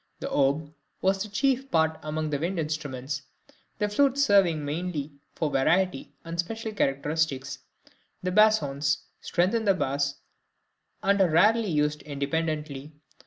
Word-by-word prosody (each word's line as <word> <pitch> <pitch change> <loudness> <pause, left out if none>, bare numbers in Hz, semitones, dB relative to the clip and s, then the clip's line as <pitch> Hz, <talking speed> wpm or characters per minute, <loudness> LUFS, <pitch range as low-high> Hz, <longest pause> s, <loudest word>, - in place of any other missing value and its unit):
The - - -5
oboe 145 +2 +1 0.3
has 190 +1 +2
the 215 - -3
chief 270 +4 0
part 160 -3 +2
among 155 0 -3
the 145 - 0
wind 175 +4 -2
instruments, 145 -3 -3 0.6
the 210 - 0
flutes 275 +6 +2
serving 175 - +3
mainly 155 -1 -3 0.2
for 155 -3 -1
variety 180 +8 +1
and 165 +1 -6
special 220 +5 -3
characteristics; 140 -5 -1 0.6
the 185 - -1
bassoons 150 -9 +3 0.2
strengthen 195 +6 +1
the 195 -2 +4
bass, 140 -3 -1 0.9
and 200 0 +3
are 185 - +4
rarely 215 +6 +4
used 150 -1 0
independently. 150 0 -3
160 Hz, 130 wpm, -27 LUFS, 145-195 Hz, 0.9 s, the